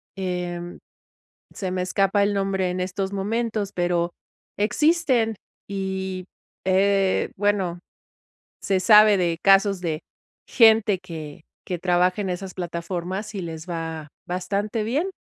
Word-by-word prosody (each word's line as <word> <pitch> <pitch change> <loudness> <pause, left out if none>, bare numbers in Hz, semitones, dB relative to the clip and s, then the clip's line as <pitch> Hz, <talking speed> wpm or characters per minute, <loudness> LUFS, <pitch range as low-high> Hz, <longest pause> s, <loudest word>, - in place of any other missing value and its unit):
em, 180 -2 -4 0.8
se 190 -2 -3
me 185 0 -1
escapa 195 +2 +2
el 205 0 0
nombre 195 -2 0
en 180 0 -3
estos 190 +1 -3
momentos, 215 +1 -1
pero 175 -1 0 0.5
existen 250 - +2 0.3
y, 190 -1 -3 0.4
eh, 195 0 +2
bueno, 190 -4 0 0.8
se 190 -1 +1
sabe 210 +1 +7
de 170 -2 0
casos 195 -1 +5
de 160 -3 -2 0.5
gente 220 -4 +5
que 160 -3 -9 0.2
que 180 - -2
trabaja 180 +3 +2
en 185 - -2
esas 185 +1 -6
plataformas 180 +3 -4
y 190 - -3
les 165 +1 -7
va 165 -2 -4 0.2
bastante 200 +5 -2
bien. 295 - -1
190 Hz, 120 wpm, -24 LUFS, 175-205 Hz, 0.8 s, sabe